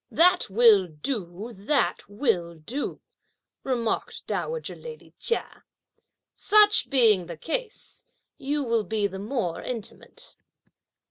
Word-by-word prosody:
"That 355 -7 +4
will 210 -2 +5
do! 185 - -5
that 215 +3 -1
will 180 -7 -1
do!" 230 - -5 0.6
remarked 240 -4 -2
dowager 475 0 -3
lady 470 -1 -11
Chia; 465 - -1 0.7
"such 420 0 +4
being 220 - +4
the 170 -2 -8
case, 430 - -5 0.4
you 290 +1 -1
will 230 -3 0
be 210 +1 -1
the 190 -1 -4
more 205 -5 -3
intimate." 230 -5 -6
230 Hz, 110 wpm, -25 LUFS, 190-290 Hz, 0.7 s, will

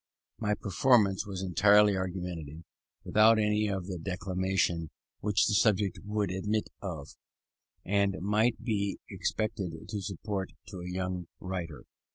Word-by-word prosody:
My 105 -1 +1
performance 100 0 +3
was 95 -2 -4
entirely 100 +3 +5
argumentative, 90 -4 -4 0.4
without 110 +1 +5
any 105 0 +2
of 95 -3 -2
the 90 -2 -5
declamation 90 -2 -1 0.3
which 105 0 +2
the 105 - +1
subject 100 -3 +2
would 105 -2 -1
admit 105 +3 -1
of, 80 -7 -5 0.8
and 100 -1 +2
might 105 +6 +1
be 100 -4 -1
expected 100 -5 -2 0.2
to 105 - -3
suggest 95 0 -4 0.2
to 95 - -7
a 90 - -6
young 90 -1 -3
writer. 90 -4 -5
95 Hz, 130 wpm, -30 LUFS, 90-105 Hz, 0.8 s, entirely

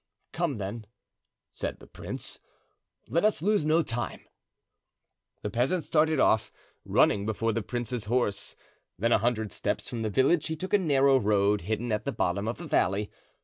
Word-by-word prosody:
"Come, 165 -7 -1
then," 105 +2 -5 0.6
said - - -4
the - - -14
prince; - - -7 0.7
"let 170 - +1
us 210 -7 +2
lose 205 -6 +2
no 160 +2 +4
time." 120 -5 -4 1.2
The 105 - -3
peasant 135 - +1
started 155 -1 +2
off, 110 - +3 0.3
running 100 - +3
before 115 +1 0
the 115 - -1
prince's 120 +1 -3
horse; 110 -3 -1 0.4
then, 115 +5 +1
a - - +5
hundred 110 -2 0
steps - - -2
from 115 - -4
the 110 - -1
village, 135 - +3
he 160 - -2
took 185 +6 -6
a 205 - +6
narrow 140 -5 +4
road 105 -1 +2
hidden 110 +6 -2
at 105 0 -1
the 140 - 0
bottom 100 -2 -1
of 115 - -2
the 175 - -8
valley. 100 - +1
120 Hz, 170 wpm, -28 LUFS, 105-155 Hz, 1.2 s, a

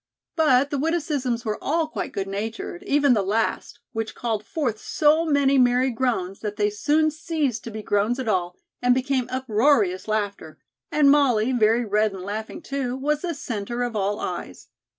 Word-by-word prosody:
But 285 -4 +3
the 285 - -1
witticisms 285 -6 -1
were 215 -1 -3
all 320 +2 +1
quite - - -5
good 195 -1 -3
natured, 205 -2 -5
even 285 -2 +4
the 215 - +2
last, 220 +4 -1 0.2
which 225 -1 -4
called 225 -3 -2
forth 240 -3 -2
so 310 +6 +2
many 280 -2 +3
merry 250 +1 +3
groans 225 -6 -1
that 210 -1 -4
they 210 0 +1
soon 300 +9 +2
ceased 310 -6 -2
to - - -5
be 215 -1 -7
groans 205 +5 +1
at 260 -3 -4
all 180 -4 0 0.2
and 245 0 +4
became 260 -1 0
uproarious 225 -6 +1
laughter, 205 -7 -3 0.3
and 290 -2 +5
Molly, 260 -5 +3
very 230 0 +3
red 210 0 +1
and 190 -1 -7
laughing, 220 - -5
too, 270 -3 -3
was 295 +2 0
the 345 -3 -3
centre 240 -2 -4
of 240 -2 -3
all 205 0 -1
eyes. - - -6
245 Hz, 175 wpm, -24 LUFS, 210-280 Hz, 0.3 s, and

